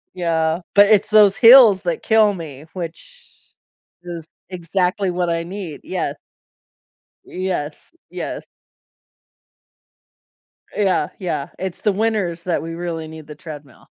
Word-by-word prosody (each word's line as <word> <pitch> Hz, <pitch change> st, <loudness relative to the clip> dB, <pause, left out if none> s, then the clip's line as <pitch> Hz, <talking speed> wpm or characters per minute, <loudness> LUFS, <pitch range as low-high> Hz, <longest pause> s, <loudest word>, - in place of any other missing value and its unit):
Yeah, 165 Hz, -1 st, 0 dB
but 205 Hz, 0 st, +7 dB
it's 210 Hz, -1 st, +3 dB
those 210 Hz, -2 st, +6 dB
hills 230 Hz, -5 st, +8 dB
that 175 Hz, -2 st, -2 dB
kill 220 Hz, -2 st, +4 dB
me, 155 Hz, -5 st, -9 dB
which 195 Hz, -, -9 dB, 0.7 s
is 170 Hz, -2 st, -8 dB, 0.2 s
exactly 180 Hz, +2 st, -1 dB
what 175 Hz, -1 st, -1 dB
I 165 Hz, 0 st, -1 dB
need, 180 Hz, -4 st, -7 dB
yeah. -, -, -3 dB, 1.1 s
Yes. 180 Hz, -5 st, -4 dB, 0.3 s
Yes. -, -, -6 dB, 2.3 s
Yeah, 190 Hz, -7 st, +1 dB
yeah, 150 Hz, -6 st, -4 dB
it's 185 Hz, -1 st, -5 dB
the 210 Hz, -, +2 dB
winters 200 Hz, -6 st, -1 dB
that 175 Hz, -2 st, -1 dB
we 165 Hz, +1 st, -6 dB
really 165 Hz, -2 st, -5 dB
need 155 Hz, -1 st, -11 dB
the 150 Hz, -, -10 dB
treadmill. 150 Hz, -5 st, -12 dB
175 Hz, 120 wpm, -20 LUFS, 160-200 Hz, 2.3 s, hills